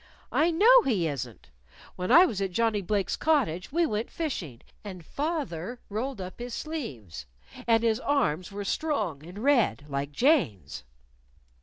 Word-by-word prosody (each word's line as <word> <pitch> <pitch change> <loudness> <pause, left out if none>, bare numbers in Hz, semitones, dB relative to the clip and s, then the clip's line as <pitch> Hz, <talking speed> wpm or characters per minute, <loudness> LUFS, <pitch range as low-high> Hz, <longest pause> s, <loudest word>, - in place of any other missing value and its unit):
"I 325 - +3
know 450 +9 +6
he 200 - 0
isn't. 125 - -6 0.4
When 180 0 -3
I 350 +3 +9
was 210 - -3
at 195 - 0
Johnnie 220 +2 +1
Blake's 195 0 -1
cottage, 255 - 0
we 340 +3 +2
went 220 -5 -2
fishing, 180 - -5 0.2
and 185 -5 -9
fath 300 - -2
er 185 +10 -6
rolled 240 +3 -3
up 185 +3 -7
his 240 0 -5
sleeves. 125 - -6 0.4
And 230 -1 +4
his 225 -1 +2
arms 220 - 0
were 200 0 -5
strong; 205 - -2
and 175 +4 -11
red, 240 - +2
like 140 +1 -3
Jane's." 240 - +1
215 Hz, 155 wpm, -27 LUFS, 170-285 Hz, 0.4 s, I